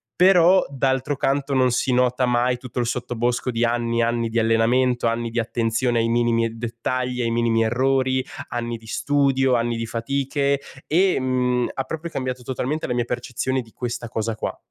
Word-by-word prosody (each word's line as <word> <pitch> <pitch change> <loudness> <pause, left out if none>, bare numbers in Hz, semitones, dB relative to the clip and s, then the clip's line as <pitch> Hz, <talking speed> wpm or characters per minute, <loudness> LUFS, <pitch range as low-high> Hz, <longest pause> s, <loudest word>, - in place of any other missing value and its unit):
però 180 0 +5
d'altro 135 +1 0
canto 140 +1 0
non 130 -1 +3
si 125 +2 +1
nota 125 0 +2
mai 125 0 +1
tutto 125 0 -6
il 120 - +1
sottobosco 120 +1 -1
di 115 0 -1
anni 115 0 0
e - - +3
anni 115 0 0
di 115 +1 0
allenamento, 120 +3 +2
anni 115 0 -1
di 115 +1 -2
attenzione 115 +1 0
ai 115 - +1
minimi 115 0 +2
e - - -1
dettagli, 125 +2 -3
ai 115 -1 0
minimi 115 -1 +2
errori, 130 +2 +1 0.2
anni 120 -1 -3
di 110 0 -17
studio, 135 0 +1
anni 120 0 0
di 115 0 -3
fatiche 140 +4 -1 0.3
e, 185 +2 +3
mhmm, 125 -1 0
ha 135 - -2
proprio 160 +4 -5
cambiato 130 -3 -3
totalmente 130 +5 -3
la 125 - -1
mia 120 0 +1
percezione 125 +2 -2
di 115 -2 -16
questa 120 0 -5
cosa 110 0 -3
qua. - - -4
125 Hz, 185 wpm, -22 LUFS, 115-130 Hz, 0.3 s, però